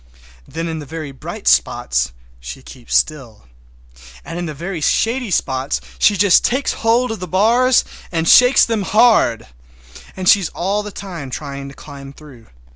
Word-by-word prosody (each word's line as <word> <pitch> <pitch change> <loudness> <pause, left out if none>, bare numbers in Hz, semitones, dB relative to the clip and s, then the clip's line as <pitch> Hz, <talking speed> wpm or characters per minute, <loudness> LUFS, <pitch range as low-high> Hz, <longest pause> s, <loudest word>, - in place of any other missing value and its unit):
Then 165 +1 -5
in 160 -1 -4
the 145 - -9
very 155 -1 -7
bright 130 - -9
spots 60 0 +1 0.3
she 60 - -9
keeps 125 -3 -7
still, 130 - -1 0.8
and 170 - -6
in 175 - -4
the 155 - -5
very 170 +2 -5
shady 235 - 0
spots 130 -6 -1 0.2
she 205 - +3
just 195 -1 +4
takes 260 +3 0
hold 235 +2 +1
of 225 - -5
the 180 - -6
bars 235 +8 +3 0.3
and 165 -1 -1
shakes 250 +7 +6
them 225 -2 -2
hard. 215 - +3 0.7
And 185 -1 -5
she 200 - +7
is 180 - -4
all 195 +4 -1
the 210 - -7
time 175 -9 -8
trying 140 0 -7
to 140 - -14
climb 140 -2 -11
through. 135 -6 -16
165 Hz, 170 wpm, -18 LUFS, 140-210 Hz, 0.8 s, she